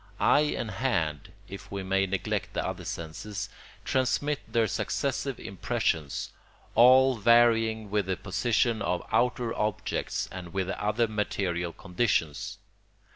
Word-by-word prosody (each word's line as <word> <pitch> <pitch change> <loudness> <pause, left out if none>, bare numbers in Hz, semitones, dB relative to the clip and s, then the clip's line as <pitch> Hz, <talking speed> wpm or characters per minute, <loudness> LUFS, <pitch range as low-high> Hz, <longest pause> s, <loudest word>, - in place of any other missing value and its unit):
Eye 150 +1 +4
and 110 - -3
hand, 85 - -1 0.2
if 100 - -9
we 100 -1 -3
may 95 +1 +1
neglect 95 0 -2
the - - -1
other - - -4
senses, 85 +5 -5 0.4
transmit 135 +3 +1
their 115 -1 +3
successive 105 - -2
impressions, 75 -4 -2 0.4
all 130 +2 +6
varying 115 -1 +4
with 105 -2 +1
the 95 -1 -1
position 110 +2 +1
of 90 0 -1
outer 125 -1 +1
objects 105 -1 -2
and 90 -1 -8
with 95 -1 0
the 95 - -4
other 110 +3 +2
material 95 -5 -1
conditions. 90 -5 -1
105 Hz, 130 wpm, -28 LUFS, 95-120 Hz, 0.4 s, all